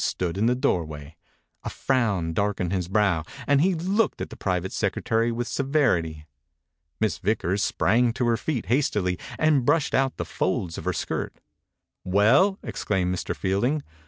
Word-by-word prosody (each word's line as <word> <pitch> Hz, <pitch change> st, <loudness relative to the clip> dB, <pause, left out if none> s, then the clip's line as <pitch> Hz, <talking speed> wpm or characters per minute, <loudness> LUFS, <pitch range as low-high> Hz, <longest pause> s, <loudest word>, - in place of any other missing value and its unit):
Fielding -, -, +1 dB
stood 90 Hz, 0 st, -3 dB
in 110 Hz, -, +3 dB
the 125 Hz, -, +3 dB
doorway 80 Hz, -, -1 dB, 0.6 s
1 -, -, -27 dB
A -, -, -2 dB
frown 100 Hz, -11 st, 0 dB
darkened 95 Hz, -1 st, -1 dB
his 90 Hz, -3 st, -1 dB
brow 95 Hz, -5 st, +2 dB, 0.2 s
and 145 Hz, -1 st, +3 dB
he 185 Hz, +2 st, +3 dB
looked 190 Hz, +6 st, 0 dB
at -, -, -5 dB
the -, -, -8 dB
private 95 Hz, 0 st, -2 dB
secretary 115 Hz, +1 st, 0 dB
with 120 Hz, +1 st, -3 dB
severity. 105 Hz, -, 0 dB, 0.7 s
Miss 105 Hz, -8 st, 0 dB
Vickers 100 Hz, -1 st, 0 dB
sprang 120 Hz, +5 st, +2 dB
to 125 Hz, 0 st, -1 dB
her 120 Hz, -1 st, +3 dB
feet 130 Hz, -2 st, -3 dB
hastily 105 Hz, -8 st, 0 dB, 0.2 s
and 155 Hz, -4 st, +3 dB
brushed 145 Hz, +3 st, +2 dB
out 135 Hz, -1 st, +1 dB
the -, -, -3 dB
folds 85 Hz, -3 st, -2 dB
of -, -, -9 dB
her -, -, +1 dB
skirt. -, -, -3 dB, 0.7 s
"Well!" 110 Hz, -, +4 dB
exclaimed 90 Hz, -3 st, -1 dB
Mr.Field 95 Hz, +2 st, -2 dB
ing. 145 Hz, +3 st, 0 dB
110 Hz, 165 wpm, -25 LUFS, 90-135 Hz, 0.7 s, Well